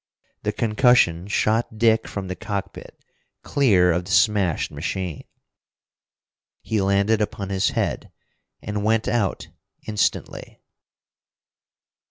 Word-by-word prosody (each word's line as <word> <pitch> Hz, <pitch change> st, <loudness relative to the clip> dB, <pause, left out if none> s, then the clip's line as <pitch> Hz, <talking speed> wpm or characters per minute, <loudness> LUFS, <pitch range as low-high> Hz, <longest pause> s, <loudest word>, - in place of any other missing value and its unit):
The 105 Hz, -, -1 dB
concussion 105 Hz, -5 st, +2 dB
shot 110 Hz, +2 st, 0 dB
Dick 115 Hz, 0 st, +3 dB
from 100 Hz, -2 st, -5 dB
the 95 Hz, -, -4 dB
cockpit 100 Hz, -2 st, -6 dB, 0.5 s
clear 95 Hz, -11 st, +3 dB
of 90 Hz, +1 st, -1 dB
the 95 Hz, -, -7 dB
smashed 95 Hz, -1 st, +2 dB
machine. 85 Hz, +2 st, -4 dB, 1.4 s
He 110 Hz, -2 st, -1 dB
landed 100 Hz, +3 st, +2 dB
upon 100 Hz, -2 st, -3 dB
his 95 Hz, 0 st, +1 dB
head, -, -, -3 dB, 0.5 s
and 105 Hz, 0 st, -3 dB
went 110 Hz, 0 st, +1 dB
out 105 Hz, -3 st, -1 dB, 0.4 s
instantly. 105 Hz, -1 st, -3 dB
105 Hz, 105 wpm, -23 LUFS, 95-110 Hz, 1.4 s, Dick